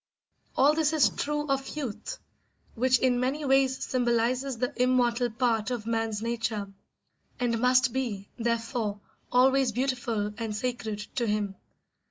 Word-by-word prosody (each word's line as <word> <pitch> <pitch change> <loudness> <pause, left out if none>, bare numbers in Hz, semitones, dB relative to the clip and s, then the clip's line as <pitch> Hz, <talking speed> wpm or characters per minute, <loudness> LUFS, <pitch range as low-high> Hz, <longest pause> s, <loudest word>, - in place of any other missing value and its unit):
All 285 +3 +6
this 315 0 +1
is 310 -3 +5
true 295 0 -2
of 275 +1 -2
youth, 280 - -4 0.6
which 255 +2 +3
in 245 -1 +2
many 275 +4 -1
ways 265 -1 +3
symbolises 245 +1 0
the 250 +1 -1
immortal 245 -1 +2
part 230 -1 0
of 240 -4 -3
man's 225 -2 -1
nature, 225 -4 -2 0.7
and 235 -2 0
must 250 +1 +4
be, 225 -7 -3
therefore, 230 -2 -1 0.3
always 260 0 +4
beautiful 235 -4 -1
and 220 -2 -3
sacred 225 -2 -3 0.2
to 240 -2 +1
him. 205 -2 -1
245 Hz, 135 wpm, -28 LUFS, 225-260 Hz, 0.7 s, All